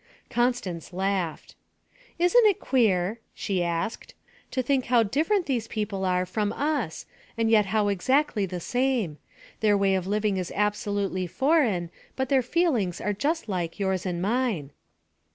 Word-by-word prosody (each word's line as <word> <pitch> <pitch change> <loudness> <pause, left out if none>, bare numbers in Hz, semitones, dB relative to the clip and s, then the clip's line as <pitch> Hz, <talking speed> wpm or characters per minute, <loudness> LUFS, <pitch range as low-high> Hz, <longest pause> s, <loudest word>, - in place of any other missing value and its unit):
Constance 240 -9 -1
laughed. 190 -3 -2 0.6
'Isn't 430 +7 +5
it 405 - +2
queer,' 215 -4 +1 0.2
she 190 -3 -1
asked, 170 +6 -3 0.3
'to 255 - -1
think 265 0 +1
how 240 -2 +4
different 325 - +1
these 240 -5 -1
people 210 -4 -3
are 180 0 +1
from 205 +3 -1
us 285 - -2 0.3
and 225 -1 +1
yet 210 -3 +5
how 210 +1 +1
exactly 210 +2 +1
the 180 0 -5
same. 245 - -1 0.4
Their 210 -2 +3
way 195 -1 +2
of 185 -1 -1
living 210 -1 0
is 180 -2 -3
absolutely 205 -2 -1
foreign, 235 - +1 0.2
but 265 -1 -2
their 270 -2 +4
feelings 245 - 0
are 210 - -1
just 300 - -1
like 175 -4 -3
yours 190 -2 0
and 175 -1 -2
mine.' 215 - 0
210 Hz, 150 wpm, -26 LUFS, 185-255 Hz, 0.6 s, Isn't